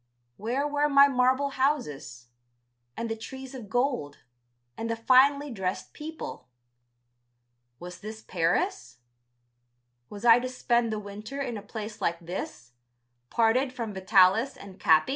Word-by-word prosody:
Where 250 - -1
were 295 0 +1
my 280 0 +7
marble 260 +1 +2
houses? 150 - -2 0.7
And 230 - -2
the 225 - -2
trees 265 +4 -9
of 240 -6 -9
gold, 245 - -1 0.6
and 230 - -4
the 230 - 0
finely 270 +5 +4
dressed 190 -4 -4
people. 315 +1 -8 1.3
Was 180 +1 -9
this 220 +2 -8
Paris! 180 - -1 1.1
Was 205 +2 -8
I 230 0 +8
to 255 +1 -4
spend 240 -2 +1
the 215 - -2
winter 210 +6 -8
in 250 -4 -3
a 210 - -6
place 210 +1 -7
like 170 0 0
this, 170 -8 -7 0.6
parted 245 +4 +2
from 230 -5 -5
Vitalis 190 +6 +4
and 195 -2 -12
Capi? 160 +6 +4
230 Hz, 135 wpm, -27 LUFS, 195-265 Hz, 1.3 s, I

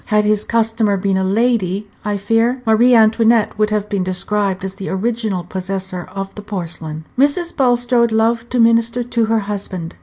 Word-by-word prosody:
(Had 210 0 +2
his 210 0 +1
customer 225 -3 +1
been 195 0 0
a 190 - 0
lady, 205 -1 0 0.2
I 210 -1 -1
fear 225 +5 0
Marie 235 +3 +4
Antoinette 225 0 +3
would 215 0 +2
have 210 -1 -1
been 200 -3 -1
described 190 +1 -1
as 190 - -5
the 195 0 -7
original 215 -2 -2
possessor 185 0 -4
of 195 0 -5
the 210 - -8
porcelain.) 165 -6 -6
Mrs. 315 +5 +1
Bulstrode 245 -2 +2
loved 225 +1 +1
to 250 - -1
minister 230 +1 +3
to 235 -1 0
her 225 0 +1
husband. 195 -4 -5
215 Hz, 175 wpm, -17 LUFS, 195-230 Hz, 0.2 s, Marie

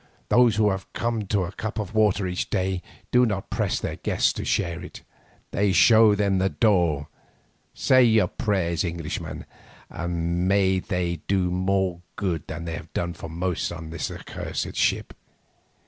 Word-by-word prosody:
"Those 120 -3 +5
who 105 -1 +3
have 95 0 -5
come 115 -3 -2
to 100 -1 +1
a 85 - -4
cup 105 +1 -5
of 105 -2 -4
water 105 -3 +3
each 90 0 -2
a - - -30
day, 95 -2 -1 0.3
do 125 0 +5
not 105 -5 -1
press - - 0
their - - -4
guests - - +1
to - - -5
share 85 0 -1
it. - - -10 0.5
They 100 -1 +2
show 110 0 +6
them 100 -2 +1
the 95 +1 +2
door. 85 -11 +2 0.7
Say 130 -1 +5
your 110 -2 +4
prayers, 95 -8 -1
Englishman, 85 -3 -5 0.5
and 85 +1 -2
may 95 -1 +3
they 90 -2 -2
do 95 -1 +2
you 90 - -1
more 95 -1 0
good 90 -6 -2
than 85 +2 -6
they 85 - -4
have 80 0 -8
done 85 0 -2
for 80 - -8
most 85 +2 -2
on 80 -2 -7
this 80 -1 -3
accursed - - -5
ship. - - 0
95 Hz, 175 wpm, -25 LUFS, 85-105 Hz, 0.7 s, show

